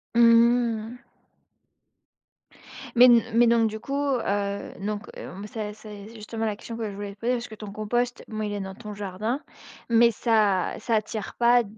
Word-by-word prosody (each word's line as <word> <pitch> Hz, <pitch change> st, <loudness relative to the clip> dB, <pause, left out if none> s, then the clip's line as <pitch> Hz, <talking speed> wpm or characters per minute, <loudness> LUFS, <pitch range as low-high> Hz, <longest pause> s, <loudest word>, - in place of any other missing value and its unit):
Mmh. 235 Hz, 0 st, +4 dB, 1.9 s
Mais 245 Hz, +1 st, +9 dB
n 240 Hz, -2 st, +7 dB
mais 235 Hz, +1 st, +5 dB
donc 230 Hz, -1 st, +4 dB
du 220 Hz, 0 st, -6 dB
coup, 275 Hz, -, -4 dB
heu, 205 Hz, -8 st, -1 dB
donc 205 Hz, +1 st, -4 dB
hem, 195 Hz, +3 st, -8 dB
c'est 210 Hz, -1 st, -5 dB
c'est 210 Hz, 0 st, -11 dB
justement 225 Hz, 0 st, -5 dB
la 210 Hz, -2 st, -1 dB
question 230 Hz, +2 st, -8 dB
que 225 Hz, -2 st, -3 dB
je -, -, -9 dB
voulais 200 Hz, 0 st, -6 dB
te -, -, -46 dB
poser, 245 Hz, +2 st, 0 dB
parce 240 Hz, 0 st, -3 dB
que 220 Hz, -, -10 dB
ton 210 Hz, -1 st, -8 dB
compost 240 Hz, +4 st, -2 dB
mais, 215 Hz, -1 st, -3 dB
il 205 Hz, -, -4 dB
est 205 Hz, -, -3 dB
dans 190 Hz, -1 st, -6 dB
ton 210 Hz, -1 st, -8 dB
jardin, 205 Hz, +6 st, -3 dB, 0.5 s
mais 235 Hz, 0 st, +5 dB
ça 215 Hz, -5 st, +2 dB
ça 230 Hz, -, 0 dB
attire 215 Hz, -1 st, -3 dB
pas 240 Hz, 0 st, +5 dB
220 Hz, 180 wpm, -26 LUFS, 205-235 Hz, 1.9 s, Mais